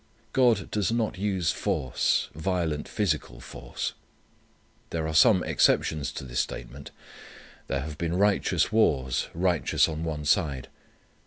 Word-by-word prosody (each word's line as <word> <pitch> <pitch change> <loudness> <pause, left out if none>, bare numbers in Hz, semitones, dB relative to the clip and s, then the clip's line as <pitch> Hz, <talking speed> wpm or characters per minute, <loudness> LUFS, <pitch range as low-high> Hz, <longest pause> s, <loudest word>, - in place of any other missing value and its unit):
God 120 -6 +3
does 105 0 0
not 115 -5 -1
use 95 -4 0
force, 65 -2 0
violent 80 -2 -2
physical 80 - -2
force. - - -6 1.0
There 80 -1 -2
are 80 - -3
some 90 +3 +5
exceptions 75 -4 +2
to - - -6
this 60 -2 -3
statement. 60 +3 -5 0.8
There 70 -1 -1
have 75 +1 -7
been 85 +1 -1
righteous 100 +1 +2
wars, 65 - +2
righteous 90 -1 +2
on 80 0 -4
one 75 -2 -4
side. 75 -5 +1
80 Hz, 130 wpm, -27 LUFS, 70-95 Hz, 1.0 s, some